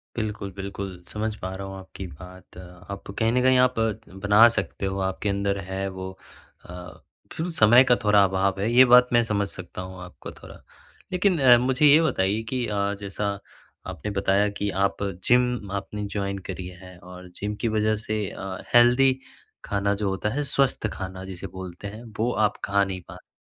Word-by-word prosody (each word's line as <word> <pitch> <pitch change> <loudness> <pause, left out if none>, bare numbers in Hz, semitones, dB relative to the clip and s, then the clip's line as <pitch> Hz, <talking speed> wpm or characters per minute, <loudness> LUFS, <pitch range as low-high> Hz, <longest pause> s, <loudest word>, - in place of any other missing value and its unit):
बिल्कुल, 105 -3 -4
बिल्कुल 95 -2 -6
समझ 110 0 -3
पा 95 +1 -4
रहा 95 0 -6
हूँ 95 - -7
आपकी 95 0 -9
बात। 90 +3 -13 0.3
आप 100 0 -7
कहीं 115 0 +2
न 125 +1 +2
कहीं 130 0 +5
आप 125 - -2 0.5
बना 105 +3 +7
सकते 95 +1 -3
हो 95 0 -2
आपके 95 +2 -2
अंदर 100 0 0
है 95 +1 -3
वो 95 0 -7 0.5
अ, 90 0 -9 0.4
फिर 165 - -3
समय 120 -2 +6
का 125 -2 +4
थोड़ा 105 -1 +5
अभाव 95 0 0
है 110 +4 0
ये 130 +2 +7
बात 125 0 +7
मैं 120 0 +5
समझ 100 -3 -1
सकता 90 -1 -6
हूँ 95 0 -9
आपको 90 - -10
थोड़ा। - - -13 0.6
लेकिन 185 -1 +2
अ, 125 -3 +7
मुझे 130 +4 +2
ये 150 +2 +7
बताइए 105 -8 +1
कि 125 -2 -1
अ, 100 -1 -1
जैसा 100 0 -3 0.5
आपने 95 +3 -5
बताया 100 +1 +2
कि 100 0 -1
आप 100 - -1 0.2
जिम 125 -4 +2
आपने 100 +1 -4
जॉइन 100 -1 -2
करी 90 -1 -5
है 90 -1 -12
और 90 +1 -12
जिम 105 +1 -4
की 115 - +1
वज़ह 110 0 +1
से 110 -1 -1
अ, 95 -1 -6 0.2
हेल्दी 125 +2 +6 0.5
खाना 100 0 0
जो 100 -1 -1
होता 95 +2 -2
है 145 +1 -1
स्वस्थ 135 -5 +1
खाना 95 -1 -6
जिसे 95 0 -7
बोलते 95 +1 -8
हैं, 110 +3 -9 0.2
वो 120 +2 +1
आप 105 -1 +1
खा 100 0 +2
नहीं 95 -2 -4
पाते। - - -13
100 Hz, 185 wpm, -25 LUFS, 95-115 Hz, 0.6 s, बना